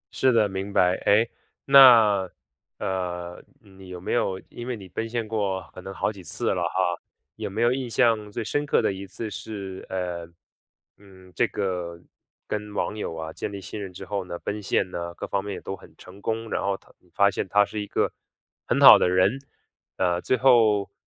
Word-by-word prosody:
是 130 - +3
的， 110 -3 +3
明 95 +1 -5
白。 90 -2 +3
哎， 110 +3 +5 0.4
那， 115 -8 +7 0.5
呃， 90 -2 -4 0.2
你 95 -2 -15
有 90 -1 -7
没 90 - -3
有 95 -5 0
因 120 - -8
为 125 -2 -3
你 95 -3 -11
奔 115 +6 -4
现 115 -2 -3
过 100 -4 -2
可 - - -10
能 95 - -8
好 95 - -1
几 100 -3 -12
次 85 - -2
了 90 - -2
哈， 90 -2 -1 0.4
有 - - -4
没 110 +4 -1
有 120 +1 +4
印 130 -2 -3
象 110 -2 +2
最 115 - -4
深 145 +6 -1
刻 145 - +2
的 - - +1
一 95 +1 -8
次 105 +4 -6
是， 100 -3 -7
呃， 90 -2 -4 0.7
嗯， 95 -2 -18
这 120 - +2
个 90 -4 -3 0.5
跟 105 -1 -4
网 105 - -1
友 105 -6 -4
啊， 80 0 -6
建 - - -5
立 100 - -6
信 95 +3 -7
任 95 -2 -6
之 90 - -9
后 100 -2 -3
呢， 85 -1 -6
奔 105 +3 -5
现 95 0 0
呢， 85 0 -5
各 - - -5
方 100 -1 -2
面 100 -1 -5
也 - - -6
都 95 - -5
很 - - -17
成 95 +2 -14
功， 115 +1 -2
然 - - -1
后 100 0 -1
他 - - -24 0.2
发 100 0 +4
现 95 - -3
他 105 +2 +4
是 105 +1 -5
一 105 - -6
个 - - 0 0.6
很 - - +1
好 - - +10
的 90 - +2
人， 95 +8 +2 0.6
呃， 90 -1 +1
最 130 - +1
后， 115 -5 +4
100 Hz, 220 characters per minute, -25 LUFS, 90-110 Hz, 0.7 s, 好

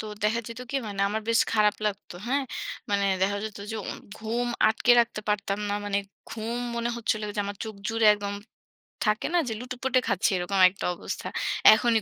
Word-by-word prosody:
তো - - -5 0.2
দেখা 220 +2 +2
যেত 230 +2 -8
কি 275 - 0
মানে 200 -1 -4
আমার 215 +2 -2
বেশ 230 - +4
খারাপ 210 -1 +4
লাগতো। 200 -3 -4
হ্যাঁ? 275 +3 +1 0.5
মানে 200 0 +2 0.2
দেখা 200 +1 +2
যেত 215 -1 -6
যে 220 - -3
অন - - -6 0.2
ঘুম 230 +3 -1 0.2
আটকে 240 +2 +4
রাখতে 235 -2 -1
পারতাম 200 -1 0
না। 205 - 0
মানে 200 0 0 0.3
ঘুম 230 +2 -3 0.2
মনে 235 0 -1
হচ্ছিল 220 -2 -1
যে 205 - +1
আমার 200 0 -5
চোখ 220 -1 -6
জুড়ে 225 -1 +2
একদম 205 0 -4 0.7
থাকে 215 0 +1
না 355 - +4
যে - - -2
লুটোপুটে 255 +1 0
খাচ্ছি 185 - +2
এরকম 190 +2 -1
একটা 195 - -6
অবস্থা। - - -5 0.5
এখনই 225 -1 +3
215 Hz, 190 wpm, -27 LUFS, 205-235 Hz, 0.7 s, বেশ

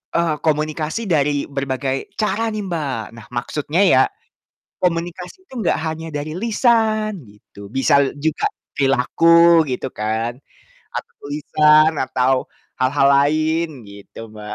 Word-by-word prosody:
eee, 170 -2 +1
komunikasi 155 +6 -1
dari 145 -3 +1
berbagai 135 -1 -3
cara 225 +1 0
nih, 215 - -3
Mbak. 145 -10 -3
Nah 115 - -12
maksudnya 150 +8 -1
ya, 135 -9 +5 0.8
komunikasi 175 - -3
itu - - -14
enggak - - +1
hanya 160 +1 -4
dari 150 +2 -4
lisan 220 -1 +1 0.2
gitu, 100 -1 -14
bisa 135 +2 +3
juga 155 +1 -1 0.3
perilaku 165 +5 +4
gitu 130 +1 -3
kan 110 +2 -2 0.6
atau - - -6 0.2
lisan 150 +1 +4
atau 130 0 +1 0.5
hal-hal 135 +2 +2
lain 155 +4 +2 0.2
gitu, 100 +2 -11
Mbak. 105 -1 -8
150 Hz, 120 wpm, -20 LUFS, 130-170 Hz, 0.8 s, ya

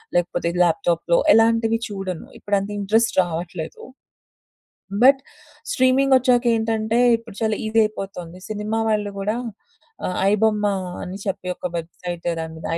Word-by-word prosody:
లేకపోతే 175 -1 0
ల్యాప్‌టాప్‌లో 170 0 +1 0.2
ఎలాంటివి 225 +1 +3
చూడను. 195 -4 -5
ఇప్పుడంత 200 0 -1
ఇన్‌ట్రెస్ట్ 220 +4 +2
రావట్లేదు. 170 -1 -6 1.2
బట్ 270 +1 +7 0.5
స్ట్రీమింగొచ్చాక 255 -1 +3
ఏంటంటే 225 0 0 0.2
ఇప్పుడు 230 -3 -13
చాలా 220 -1 +1
ఈసీ 225 +1 0
అయిపోతోంది 190 -4 -6
సినిమా 215 +1 -2
వాళ్ళు 210 -1 0
గూడా 210 +3 -1 0.7
ఆహ్, 180 - -3
ఐ - - +3
బొమ్మ 210 -1 +2 0.4
అని 185 +2 -7
చెప్పి 190 -2 -3
ఒక - - -5
వెబ్‌సైట్ 175 +1 -7
దాని 160 0 -7
210 Hz, 115 wpm, -22 LUFS, 180-225 Hz, 1.2 s, బట్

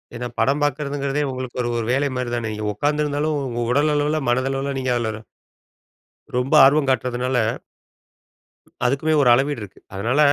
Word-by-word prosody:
ஏன்னா, 120 +1 -4
படம் 140 +2 +2
பாக்கிறதுங்கிறதே, 145 0 -1
உங்களுக்கு 130 -1 -6
ஒரு, 120 - -1
ஒரு 115 - -2
வேலை 140 +2 +1
மாரி 125 -1 -2
தானே. 110 -2 -3 0.2
உட்காந்து 150 +7 0
இருந்தாலும், 150 +1 -1
உங்க 120 -1 -3
உடல் 150 +2 +3
அளவுல, 150 +1 +1
மனதளவுல, 135 +2 0
நீங்க 130 -1 0
அதுல. 110 -2 -3 1.2
ரொம்ப 125 +3 0
ஆர்வம் 140 0 +3
காட்டுறதுனால. 125 0 0 1.5
"அதுக்குமே, 140 +5 +1
ஒரு 125 - +4
அளவீடு 135 -1 +1
இருக்கு."அதனால, 105 +6 -4
135 Hz, 140 wpm, -22 LUFS, 120-145 Hz, 1.5 s, ஒரு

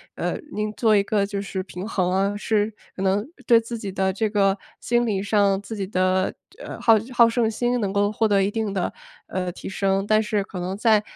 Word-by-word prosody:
呃， - - -2
您 210 0 -2
做 220 -2 +3
一 200 - +4
个 205 -1 +1
就 200 0 -4
是 190 -1 -4
平 185 +1 -7
衡 185 -4 0
啊。 195 +2 +1
是 210 0 0 0.2
可 - - -6
能 195 +2 +1 0.2
对 230 -2 +7
自 230 +1 -6
己 205 -3 -5
的 190 0 0
这 215 +3 -1
个 200 -1 +2 0.2
心 240 0 +1
理 200 -4 -1
上， 200 -1 +2
自 220 - -8
己 195 -3 -3
的， 185 -1 +1 0.3
呃， - - -8
好 225 - +6 0.2
好 235 -1 +6
胜 230 -1 +1
心 245 +2 0
能 200 -3 -1
够 205 +1 +2
获 220 +1 +1
得 200 -2 +3
一 200 - 0
定 215 -2 -2
的， 185 -3 -1 0.4
呃， 180 -1 -2
提 - - -8
升。 195 0 0
但 215 +1 +3
是 210 -2 -1
可 185 -2 -8
能 185 +2 -3
在， 215 0 +4
205 Hz, 240 characters per minute, -23 LUFS, 195-220 Hz, 0.4 s, 对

